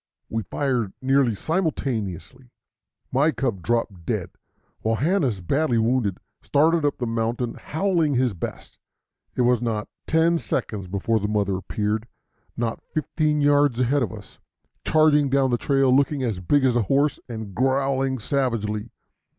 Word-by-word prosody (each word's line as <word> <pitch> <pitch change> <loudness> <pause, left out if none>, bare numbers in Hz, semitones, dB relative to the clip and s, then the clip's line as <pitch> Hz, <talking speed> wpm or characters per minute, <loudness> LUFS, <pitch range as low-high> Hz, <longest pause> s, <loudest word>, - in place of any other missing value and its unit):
We 115 - -1
fired 120 -1 -1
nearly 135 -3 +2
simultaneously. 130 - -3 0.6
My 140 +5 +3
cub 120 -11 -2
dropped 110 -5 -1
dead, - - -2 0.5
while 110 +1 0
Hanna's, 140 - +1
badly 130 - +1
wounded, 110 -4 +1 0.2
started 160 +3 +2
up 145 - +1
the 125 - -2
mountain 115 +1 -1
howling 165 -4 0
his 125 -3 +2
best. 85 - -7 0.6
It - - +1
was 120 -1 +3
not 110 -2 -2 0.2
ten 165 +1 +3
seconds 100 -10 -3
before 100 +4 0
the 105 - -2
mother 100 -2 0
appeared, 105 +4 -2 0.5
not 115 -1 -2
fifteen 155 0 0
yards 145 -3 +3
ahead 130 +3 +2
of 110 -7 -1
us, - - -12 0.4
charging 150 -2 +4
down 135 -1 +2
the 120 - +1
trail 135 -2 +3
looking 140 0 +2
as 110 -7 -1
big 135 +10 +2
as 125 -2 +3
a 120 - +3
horse 140 +7 +1
and 110 -4 -6
growling 135 +3 +1
savagely. 115 -4 -1
125 Hz, 145 wpm, -24 LUFS, 110-145 Hz, 0.6 s, charging